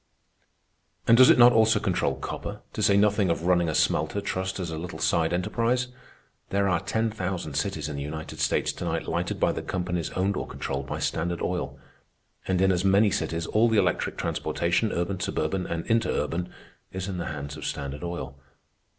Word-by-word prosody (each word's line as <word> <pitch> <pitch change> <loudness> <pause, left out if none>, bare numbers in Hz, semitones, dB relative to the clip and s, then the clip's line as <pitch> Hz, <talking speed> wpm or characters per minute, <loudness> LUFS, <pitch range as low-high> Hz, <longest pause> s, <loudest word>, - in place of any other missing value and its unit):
And 115 - +7
does 130 +1 +8
it - - +7
not 120 0 +8
also 110 -1 +4
control - - 0
copper, - - -6
to - - -3
say 100 - +4
nothing 105 -2 +3
of 85 0 0
running 85 -1 +3
a 80 - -1
smelter 80 +6 +1
trust 95 -1 -3
as 85 -3 -3
a 80 - -4
little 90 +1 -6
side 80 -1 +1
enterprise? 120 +7 0 0.6
There 100 0 +1
are 90 -3 +2
ten 110 +5 -1
thousand 90 -7 -4
cities 75 +1 -2
in 75 -2 -5
the - - -4
United 80 +2 -6
States - - +1
to - - -7
night 80 -1 -2
lighted 85 +1 -2
by - - +3
the - - -4
companies 90 -2 -2
owned 95 +2 0
or - - -3
controlled 65 0 -4
by - - -3
Standard 85 +1 -2
Oil, - - -2 0.7
and 95 -1 +1
in 95 0 +4
as 90 0 +1
many 100 +2 +4
cities 80 -1 -1
all 110 +6 +3
the 110 - +2
electric 90 -4 +1
transportation,—urban, 85 +1 -1
suburban, 90 0 -1
and 85 0 -3
interurban,—is 95 -4 -2
in 95 -2 -4
the 85 - -3
hands 70 -1 -5
of 75 - -9
Standard 70 +2 -4
Oil. 85 -6 -5
90 Hz, 185 wpm, -26 LUFS, 80-100 Hz, 0.7 s, does